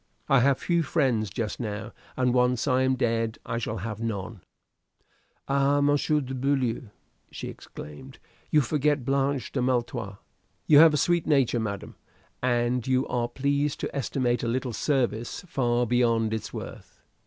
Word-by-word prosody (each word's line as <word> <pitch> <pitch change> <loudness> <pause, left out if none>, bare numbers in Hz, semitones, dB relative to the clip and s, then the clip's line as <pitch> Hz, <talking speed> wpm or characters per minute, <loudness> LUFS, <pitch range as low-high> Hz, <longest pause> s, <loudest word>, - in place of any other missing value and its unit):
I 135 - +5
have 135 +1 +3
few 170 -1 +1
friends 120 -8 +1
just 110 +1 -4
now, 105 -2 -4 0.3
and 125 -1 +2
once 125 +1 +2
I 130 -1 +3
am 130 0 +2
dead 115 -3 0
I 115 - -2
shall 110 -1 -3
have 110 -2 -5
none." 110 -3 -4 1.1
"Ah, 140 +1 +2
Monsieur 145 +1 +2
de 135 -1 -6
Beaulieu!" 130 -3 0 0.4
she - - -6
exclaimed, 130 - -10 0.3
"you 150 - +4
forget 145 0 0
Blanche 135 -2 0
de 130 - -1
Maletroit." 120 -5 -1 0.5
"You 145 -2 +7
have 160 -1 +7
a - - +2
sweet 170 +3 +1
nature, 135 -6 +3
madam, 100 -3 -5 0.4
and 120 0 +1
you 130 0 +2
are 120 -1 0
pleased 140 +3 -1
to - - -4
estimate 125 -2 0
a 115 - -2
little 125 +1 -1
service 120 +2 -1
far 120 -5 +1
beyond 115 -2 +2
its 110 - -4
worth." - - -9
125 Hz, 155 wpm, -26 LUFS, 115-140 Hz, 1.1 s, You